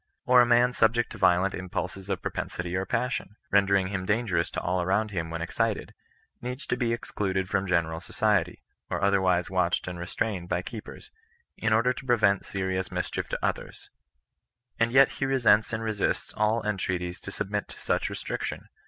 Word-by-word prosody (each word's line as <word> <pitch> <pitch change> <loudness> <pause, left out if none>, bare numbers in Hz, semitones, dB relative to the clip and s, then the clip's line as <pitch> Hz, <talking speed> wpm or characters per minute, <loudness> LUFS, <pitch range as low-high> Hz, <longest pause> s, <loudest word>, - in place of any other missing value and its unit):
Or 125 0 +7
a 120 - +4
man 120 +1 +4
subject 120 0 +2
to - - -9
violent 90 +2 +4
impulses 95 +1 -5
of 95 -3 -2
propensity 90 0 -3
or 95 +1 -1
passion, 125 -5 -2 0.2
rendering 100 -1 +3
him 95 -2 -3
dan 115 +3 +1
gerous 85 -5 0
to - - -1
all 90 +1 0
around 100 +4 +1
him 85 -4 -3
when 80 0 -3
excited, 85 - -1 0.5
needs 125 +3 -5
to - - 0
be 120 -2 0
ex 115 - -4
cluded 95 -2 -1
from 95 0 0
general 80 -2 0
society, 100 -3 0 0.3
or - - -2
otherwise 95 -3 +2
watched 90 -2 +1
and 90 -1 -5
restrained 90 +1 -3
by 90 - 0
keepers, 110 +2 -9 0.4
in 110 - -1
order 115 +3 +4
to 135 - -9
prevent 105 -5 +3
serious 95 -1 -2
mis - - -2
chief - - -3
to - - -2
others; - - -4 0.9
and 115 0 +3
yet 135 +2 +6
he 135 - -2
resents 115 -5 +4
and 110 0 -2
resists 110 -3 -1
all 110 +1 +1
en 105 -1 0
treaties 90 -1 -2
to - - -8
submit 105 +1 -3
to - - -12
such - - 0
restriction. - - -4
100 Hz, 190 wpm, -27 LUFS, 90-115 Hz, 0.9 s, Or